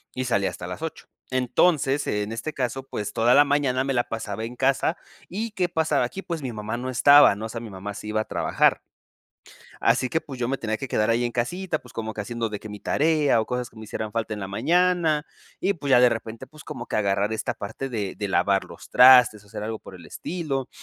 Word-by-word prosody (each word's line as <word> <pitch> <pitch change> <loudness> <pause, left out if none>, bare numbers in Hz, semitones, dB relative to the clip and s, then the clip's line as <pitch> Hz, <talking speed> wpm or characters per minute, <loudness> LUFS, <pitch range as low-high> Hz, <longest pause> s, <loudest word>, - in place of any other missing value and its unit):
y 130 - -2
salía 100 -5 +1
hasta 90 - -8
las 90 - -7
8. 160 - -6 0.2
Entonces, 135 +2 +2
en 105 +1 -1
este 135 +7 -4
caso, 130 0 -2
pues, 105 0 -4
toda 120 +2 +3
la 145 - +8
mañana 140 -3 +1
me 135 0 -1
la 120 -1 +1
pasaba 110 -1 -4
en 120 - -7
casa, 135 +5 +1 0.3
¿y 215 +4 -3
qué 185 -3 0
pasaba 160 -6 +1
aquí? 190 +10 -6
Pues, 170 -4 -5
mi 125 -4 -4
mamá 110 +2 -4
no 130 +2 -4
estaba, 140 -1 +7
¿no? 110 +2 -5
O - - -12
sea, 115 +1 -5
mi 115 - -8
mamá 100 +1 -7
sí - - -8
iba 110 0 0
a - - -5
trabajar. - - +1 1.0
Así 130 - +2
que, 160 - +1
pues, 135 -3 -9
yo 120 - 0
me 135 - -1
tenía 110 -1 -2
que 135 - -5
quedar 105 -2 +1
ahí 115 +1 +2
en 120 - -2
casita, 160 +8 -2
pues, 125 - -16
como 110 -1 -4
que 105 - -5
haciendo 115 +1 -3
de 105 - -5
que 110 - -9
mi 105 - -8
tarea 150 -5 +2
o 110 - -3
cosas 125 0 -3
que - - -23
me 110 - -9
hicieran 110 0 -5
falta 115 -1 -2
en 105 - -7
la 95 - -5
mañana, 165 - +2 0.4
y, 195 - +2
pues, 145 -4 -6
ya, 125 - +7
de 125 - +7
repente, 115 0 -5
pues, 155 -1 -15
como - - -7
que - - -2
agarrar 100 0 +1
esta 110 - -2
parte 110 +6 -6
de 105 -6 -4
de 105 - -3
lavar 95 0 +2
los - - -13
trastes 125 -5 +7
o 100 - -21
hacer 110 -1 -7
algo 110 0 -4
por 95 - -13
el 85 -2 -12
estilo. 150 -7 -4
120 Hz, 250 wpm, -24 LUFS, 110-145 Hz, 1.0 s, la